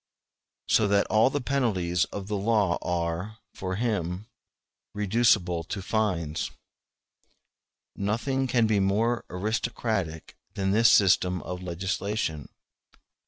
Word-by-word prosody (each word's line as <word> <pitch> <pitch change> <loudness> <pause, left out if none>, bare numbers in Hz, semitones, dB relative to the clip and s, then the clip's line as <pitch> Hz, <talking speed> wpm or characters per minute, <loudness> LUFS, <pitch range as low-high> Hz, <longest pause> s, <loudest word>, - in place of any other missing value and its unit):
So 110 - +3
that 100 0 +3
all 110 +3 +5
the 145 - -1
penalties 105 -11 0
of 100 -1 -7
the 105 - -2
law 100 -3 +1
are, 90 +4 -2 0.2
for 95 -1 -4
him, 100 -4 -2 0.7
reducible 105 -5 +2
to 100 - -4
fines. 90 -8 -1 1.5
*n 100 - -4
Nothing 130 +6 0
can 120 -2 +3
be 110 -2 +2
more 110 +5 +1
aristocratic 105 -4 -2 0.2
than 95 -1 0
this 110 +3 +5
system 90 -3 +4
of 90 0 -6
legislation. 95 -2 -3
100 Hz, 115 wpm, -27 LUFS, 90-110 Hz, 1.5 s, all